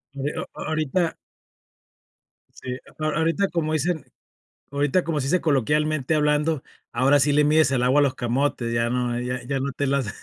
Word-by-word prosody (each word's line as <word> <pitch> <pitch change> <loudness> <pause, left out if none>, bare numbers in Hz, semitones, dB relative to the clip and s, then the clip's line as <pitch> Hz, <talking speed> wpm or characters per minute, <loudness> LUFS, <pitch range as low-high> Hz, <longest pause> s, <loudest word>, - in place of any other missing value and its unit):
Oh, 135 - -5
eh, 150 - -2
o - - -1
oh, - - -9
ahorita. 160 +2 0 1.4
Si, 130 -1 -6
a 155 +4 -8
a 155 - -1
ahorita 165 +5 +1
como 155 -2 -1
dicen 160 +1 -1 0.7
ahorita 145 +5 +1
como 160 -3 -1
se 135 - -2
dice 180 +4 +2
coloquialmente 150 +1 +1
hablando, 150 0 +1 0.3
ahora 135 +4 +4
sí 145 +2 +3
le 150 +1 +4
mides 155 -1 +4
el 130 -3 +1
agua 130 +4 +4
a - - +4
los 140 -2 +1
camotes, 120 -1 -1
ya 115 0 +1
no, 120 -1 -1
ya 125 0 -3
ya 135 +2 -2
no 140 +1 -2
te 140 +2 -2
las 135 -6 0
145 Hz, 195 wpm, -24 LUFS, 130-155 Hz, 1.4 s, ahora